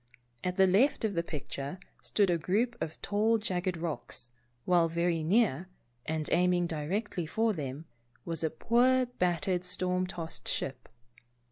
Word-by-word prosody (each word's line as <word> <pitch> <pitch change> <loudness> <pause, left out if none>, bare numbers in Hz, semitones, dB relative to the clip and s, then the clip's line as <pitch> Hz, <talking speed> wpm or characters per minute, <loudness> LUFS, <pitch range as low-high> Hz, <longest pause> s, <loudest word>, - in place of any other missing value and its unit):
At 180 0 -1
the 190 - +7
left 220 +7 +3
of 210 - 0
the 170 - +1
picture 145 0 -5 0.2
stood 200 -4 +2
a 170 - +1
group 225 +9 +1
of 160 - -4
tall 215 +3 +2
jagged 185 -4 -2
rocks, 155 -7 -4 0.3
while 175 -2 +4
very 170 -1 0
near, 185 - +2 0.4
and 155 -1 -1
aiming 180 0 +3
directly 170 +3 -2
for 220 +6 +1
them, 145 -2 -5 0.4
was 165 -2 -2
a 160 - +2
poor 250 +9 +3
battered, 180 -5 0
storm 180 0 0
tossed 165 -3 -7
ship. 125 -3 -3
180 Hz, 145 wpm, -31 LUFS, 160-205 Hz, 0.4 s, the